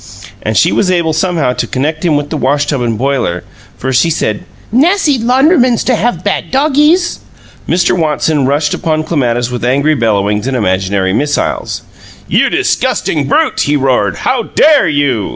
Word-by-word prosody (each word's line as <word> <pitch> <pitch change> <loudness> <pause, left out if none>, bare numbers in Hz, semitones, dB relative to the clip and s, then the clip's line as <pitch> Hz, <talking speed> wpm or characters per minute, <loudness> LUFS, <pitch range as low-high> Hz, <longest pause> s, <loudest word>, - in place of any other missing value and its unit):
And - - -2
she - - +3
was 190 - +1
able 170 -3 +1
somehow 160 -5 0
to - - -3
connect 155 +5 -2
him 160 -4 +2
with 145 0 -4
the 155 - -2
wash 145 +2 +1
tub 140 -3 -2
and 115 -2 -1
boiler, 125 -9 -1 0.3
for 130 +1 -3
she 150 +7 +3 0.2
added, 105 -1 -3 0.3
"Nassy 295 - +2
laundrymans 255 +1 +2
to 250 - +1
have 215 -6 -1
bad 205 - -2
doggies!" 300 +6 +2 0.5
Mr. 175 +1 +2
Watson 155 -4 0
rushed 145 +2 0
upon 155 -3 -1
Clematis 125 -6 -1
with 125 -1 -5
angry 140 +5 +2
bellowings 105 -3 0
and 135 -1 -1
imaginary 95 -2 0
missiles. 145 +6 -2 0.4
"You - - +2
disgusting - - -1
brute!" - - +1
he 150 - +2
roared. 130 - +1
"How 255 -2 +1
DARE 290 - +3
you?" 145 -8 0
150 Hz, 165 wpm, -12 LUFS, 125-200 Hz, 0.5 s, she